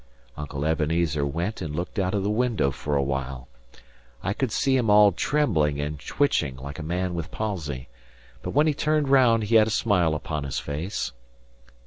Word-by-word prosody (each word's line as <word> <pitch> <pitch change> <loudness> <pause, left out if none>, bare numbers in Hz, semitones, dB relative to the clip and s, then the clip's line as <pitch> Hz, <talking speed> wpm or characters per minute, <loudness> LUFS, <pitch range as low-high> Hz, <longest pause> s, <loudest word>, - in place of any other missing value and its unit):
Uncle 70 -1 -5
Ebenezer 80 -1 +1
went 85 +10 -2
and 75 -4 -4
looked 90 +5 -3
out 95 +1 0
of 100 - 0
the 100 - 0
window 110 - +1
for 75 +2 -3
awhile. 65 -2 -2 0.8
I 100 - 0
could 130 +1 -2
see 135 +4 +2
him 120 -4 +1
all 105 0 +7
trembling 85 - +1
and 75 0 -3
twitching, 70 - 0
like 70 +4 -8
a - - -4
man 90 +3 -2
with 85 -2 -4
palsy. 80 - -4 0.5
But - - -5
when 150 +2 +3
he 155 - +2
turned 150 -1 0
round, 125 -5 +5
he 115 +2 +4
had 110 -1 +5
a - - -1
smile 95 -8 +2
upon 75 -1 -4
his 70 - -4
face. 75 +1 -3
85 Hz, 180 wpm, -25 LUFS, 75-110 Hz, 0.8 s, all